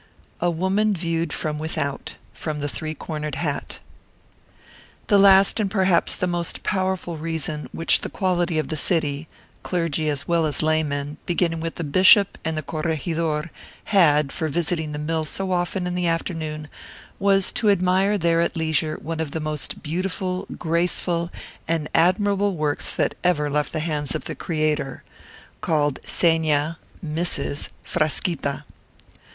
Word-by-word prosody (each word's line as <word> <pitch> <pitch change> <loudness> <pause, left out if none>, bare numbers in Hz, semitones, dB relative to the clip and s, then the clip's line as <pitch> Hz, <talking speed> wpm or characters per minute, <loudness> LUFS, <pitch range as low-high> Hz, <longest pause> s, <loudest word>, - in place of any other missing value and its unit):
A 175 - +2
WOMAN 190 +5 +1
VIEWED 165 -2 -1
FROM 150 -1 -2
WITHOUT 140 -3 -3 0.2
From 155 -2 -4
'The 145 0 -2
Three 155 +2 -3
Cornered 150 -3 -4
Hat' 145 0 -3 1.3
The 205 -2 +4
last 195 +1 +6
and 205 -2 +1
perhaps 190 -3 +2
the - - -1
most 175 -1 -2
powerful 185 -3 -1
reason 155 -1 -3
which 165 - +2
the - - -4
quality 175 -4 0
of 155 -3 -1
the 155 - -2
city 155 -2 0 0.3
clergy 165 -3 -1
as 145 -1 -2
well 170 -2 +2
as 150 - +2
laymen, 150 -2 0
beginning 170 -1 +1
with 165 0 -4
the 175 - -4
bishop 185 +6 +5
and 160 0 -2
the 155 - -2
corregidor 160 0 -2 0.4
had 150 -7 +5
for 160 - -2
visiting 160 0 -1
the 150 - -4
mill 160 +2 -1
so 185 +5 -3
often 180 +1 0
in 180 - -2
the 180 -1 0
afternoon, 160 -2 -2 0.5
was 195 -1 +4
to 215 - +1
admire 190 +1 +3
there 170 -2 +2
at 170 - -1
leisure 160 -1 0
one 160 +1 -4
of 160 -2 -1
the 160 - -3
most 155 -2 -3
beautiful, 185 +3 -2
graceful, 170 0 0 0.4
and 160 -2 0
admirable 200 +3 +3
works 150 -1 -1
that - - +1
ever 150 -5 +2
left 150 0 0
the 160 - -1
hands 150 -3 -1
of - - -4
the - - -4
Creator: 155 -4 -1 0.6
called 150 -5 +1
Seña 160 -2 +1 0.3
[Mrs.] 155 -2 -2
Frasquita. 155 -2 -1
165 Hz, 150 wpm, -23 LUFS, 150-180 Hz, 1.3 s, last